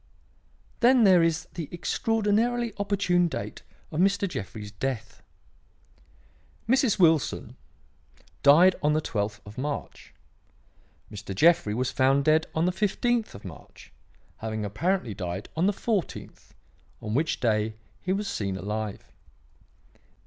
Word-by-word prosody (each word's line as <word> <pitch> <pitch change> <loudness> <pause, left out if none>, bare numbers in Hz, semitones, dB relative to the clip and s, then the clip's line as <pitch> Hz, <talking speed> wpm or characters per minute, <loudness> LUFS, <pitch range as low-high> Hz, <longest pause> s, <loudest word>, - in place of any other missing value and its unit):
"Then 250 0 +5
there 185 -4 +6
is 165 0 0
the 165 -5 -6
extraordinarily 225 +7 0
opportune 195 -3 +2
date 170 - -6 0.3
of 155 - -3
Mr. 195 +2 +2
Jeffrey's 105 - -6
death. 115 0 -5 1.5
Mrs. 260 -2 +3
Wilson 165 -5 +2 0.9
died 170 +6 +6
on 150 0 +2
the 155 - +2
twelfth 105 -4 -3
of 105 +4 -10
March. 145 +2 -5 1.0
Mr. 100 -1 -7
Jeffrey 160 - +4
was 130 +2 -1
found 135 +1 +2
dead 155 +1 +3
on 160 +1 +2
the 180 - +2
fifteenth 215 - 0
of 100 - -12
March, 80 -6 -12 0.4
having 110 -1 -4
apparently 125 - -1
died 90 0 -5
on 170 +4 +2
the - - +4
fourteenth, 205 -1 -4 0.4
on 105 -1 -5
which 155 +6 0
day 110 -2 0 0.3
he 185 - -2
was 200 +2 -1
seen 100 - -3
alive. 105 +1 -5
155 Hz, 125 wpm, -26 LUFS, -, 1.5 s, there